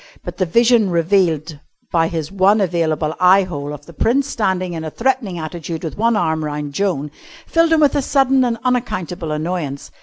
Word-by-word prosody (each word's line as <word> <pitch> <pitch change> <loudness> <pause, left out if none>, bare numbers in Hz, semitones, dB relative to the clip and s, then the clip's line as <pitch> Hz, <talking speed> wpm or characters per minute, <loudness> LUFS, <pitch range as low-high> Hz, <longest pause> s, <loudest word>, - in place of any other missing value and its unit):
But - - -7
the 185 - 0
vision 230 +2 +3
revealed 165 -3 +1 0.3
by 165 -1 +2
his 160 -2 -4
one 195 +2 +3
available 165 -4 0
eye 185 +2 +6
hole 145 -5 -5
of 145 -1 -9
the 170 - -13
Prince 255 - +1
standing 185 -8 -1
in 160 -1 -5
a 160 - -4
threatening 230 - -1
attitude 165 0 -6
with 160 - -5
one 230 +2 +1
arm 160 -4 0
round 150 -1 -4
Joan 150 -5 -1 0.3
filled 330 0 +2
him 320 -1 +4
with 290 -2 +3
a 285 - +2
sudden 270 -1 +2
and 235 -2 0
unaccountable 185 -10 -2
annoyance. 150 -3 -4
180 Hz, 185 wpm, -19 LUFS, 160-230 Hz, 0.3 s, eye